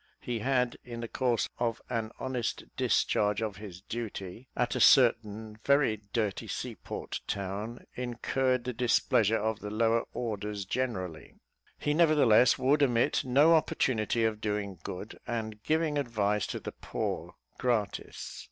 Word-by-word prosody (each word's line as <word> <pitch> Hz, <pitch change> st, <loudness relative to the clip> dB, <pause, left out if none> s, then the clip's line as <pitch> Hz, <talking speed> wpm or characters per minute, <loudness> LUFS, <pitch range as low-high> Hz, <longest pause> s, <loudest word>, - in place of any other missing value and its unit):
He 120 Hz, -2 st, -3 dB
had, 125 Hz, 0 st, +1 dB
in 120 Hz, -1 st, -7 dB
the 115 Hz, -, -4 dB
course 120 Hz, -1 st, 0 dB
of 115 Hz, -2 st, 0 dB
an 115 Hz, -3 st, -2 dB
honest 125 Hz, -3 st, -2 dB
discharge 105 Hz, -1 st, +2 dB
of 110 Hz, -4 st, -3 dB
his 95 Hz, -4 st, -9 dB
duty, 110 Hz, 0 st, -6 dB
at 125 Hz, -, 0 dB
a -, -, 0 dB
certain 110 Hz, -4 st, +4 dB
very 140 Hz, -6 st, +3 dB
dirty 110 Hz, -4 st, -1 dB
sea -, -, -4 dB
port -, -, -6 dB
town, 100 Hz, +4 st, -4 dB
incurred 125 Hz, +1 st, 0 dB
the 125 Hz, 0 st, -3 dB
displeasure 115 Hz, -2 st, +3 dB
of 110 Hz, 0 st, -1 dB
the 105 Hz, -, -6 dB
lower 115 Hz, +2 st, +2 dB
orders 105 Hz, -3 st, -3 dB
generally: 95 Hz, -8 st, -3 dB, 0.4 s
he 150 Hz, -, 0 dB
nevertheless 150 Hz, -8 st, +5 dB
would 135 Hz, +3 st, +3 dB
omit 120 Hz, -4 st, +3 dB
no 140 Hz, +6 st, +5 dB
opportunity 115 Hz, -7 st, +1 dB
of 110 Hz, -1 st, -1 dB
doing 105 Hz, -4 st, -2 dB
good, 95 Hz, +5 st, -7 dB
and 110 Hz, -2 st, -3 dB
giving 155 Hz, +1 st, +1 dB
advice 105 Hz, -6 st, 0 dB
to -, -, -4 dB
the -, -, -6 dB
poor, -, -, -4 dB, 0.2 s
gratis. 115 Hz, -5 st, -2 dB
115 Hz, 145 wpm, -30 LUFS, 105-125 Hz, 0.4 s, nevertheless